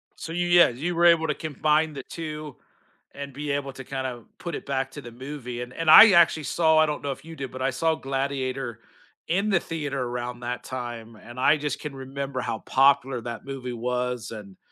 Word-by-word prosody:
So, 165 - -7
you 175 +1 -1
yeah, 175 0 +7
you 155 +9 -3
were 170 - +3
able 165 -2 +5
to 150 - +1
combine 155 +1 +1
the 135 -3 -7
2 155 -4 -7 0.6
and 140 -1 -7
be 145 +1 -4
able 140 -1 -2
to 135 - -9
kinda 130 -3 -5 0.2
put 170 -3 -5
it - - -7
back 135 -1 -1
to 145 - -8
the 120 - -10
movie 125 -1 -7
and 125 +1 -7
and 165 -1 -1
I 215 +6 +11
actually 170 -3 +5
saw 160 +1 +3
I 155 - +6
don't 150 -1 -3
know 140 - -1
if 135 +2 -8
you 165 0 -9
did, 135 -4 -6
but 130 - -7
I 135 - +2
saw 160 +5 +1
Gladiator 135 -4 -3 0.5
in 195 +5 +1
the 190 -4 +3
theater 145 -5 -4
around 120 0 -4
that 120 0 -4
time, 120 -3 -6
and 120 +3 -11
I 145 +4 +5
just 150 -1 -3
can 150 -2 -6
remember 135 0 -5
how 110 - -3
popular 135 -2 +3
that 115 +1 -7
movie 135 -2 -5
was, 125 0 -2
and 100 -4 -10
135 Hz, 215 wpm, -25 LUFS, 125-155 Hz, 0.6 s, I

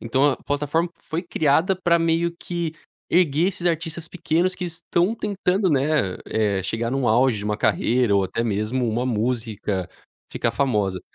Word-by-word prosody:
então 130 +4 +1
a - - -4
plataforma 150 +4 -1
foi 165 +2 -4
criada 170 +2 +2
para 170 -2 +2
meio 165 +1 +1
que 170 -2 -3 0.4
erguer 170 0 +3
esses 180 -2 -3
artistas 165 -1 -2
pequenos 180 +1 0
que 180 - -5
estão 175 +3 0
tentando, 195 -3 0
né, 140 -9 +1
eh, 100 -3 0
chegar 115 +5 -2
num 135 -1 0
auge 120 +1 +3
de 100 - -6
uma 105 0 -1
carreira, 115 0 +2
ou 100 - +2
até 115 - -2
mesmo 115 +3 -1
uma 115 +3 -1
música 110 -5 -2 0.4
ficar 115 - 0
famosa. 105 -7 0
140 Hz, 160 wpm, -23 LUFS, 110-170 Hz, 0.4 s, erguer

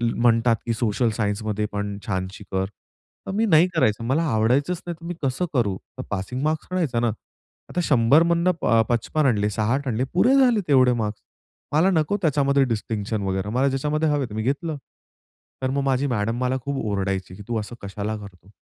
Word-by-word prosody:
म्हणतात 115 0 +3
की 115 - 0
सोशल 115 +1 +1
सायन्समध्ये 105 0 -1
पण 100 0 -3
छानशी 95 0 -3
कर. 95 0 0 0.6
तर - - -4
मी 220 +2 +2
नाही 170 -3 +5
करायचं, 115 -7 +2
मला 140 +7 +1
आवडायचंच 130 +10 +1
नाहीतर 170 -1 -7
मी 175 - -3
कसं 135 +6 0
करू? 105 -8 +1 0.2
तर - - -4
पासिंग 105 +6 -3
मार्क्स 155 0 -1
आणायचा 160 -10 0
ना. 120 - +1 0.6
आता 180 - -2
100मधनं 165 +7 +4
अ, - - +3
प 115 -1 +3
55 145 +6 0
आणले, 105 -5 +2
60 120 +7 -1
आणले, 120 +1 0
पुरे 240 +10 +4
झाले 250 -5 +5
तेवढे 130 -3 +5
मार्क्स, 105 0 -4 0.5
मला 160 +6 +4
नको 180 +7 0
त्याच्यामध्ये 140 -4 +3
डिस्टिंक्शन 110 -2 -2
वगैरे, 95 +1 -2
मला 130 +5 +2
ज्याच्यामध्ये 150 +4 0
हवे 145 -2 +1
ते - - -9
मी 110 - -2
घेतलं. 145 +4 -1 0.9
तर 130 - +1
मग 140 +1 0
माझी 135 0 +1
मॅडम 115 -1 -1
मला 130 +1 +1
खूप 140 -1 -2
ओरडायची 95 -3 -2
की, 105 - -10
"तू 115 -2 -1
असं 105 +3 -7
कशाला 100 +2 -4
करतो?" 100 -1 -13
125 Hz, 185 wpm, -23 LUFS, 105-150 Hz, 0.9 s, नाही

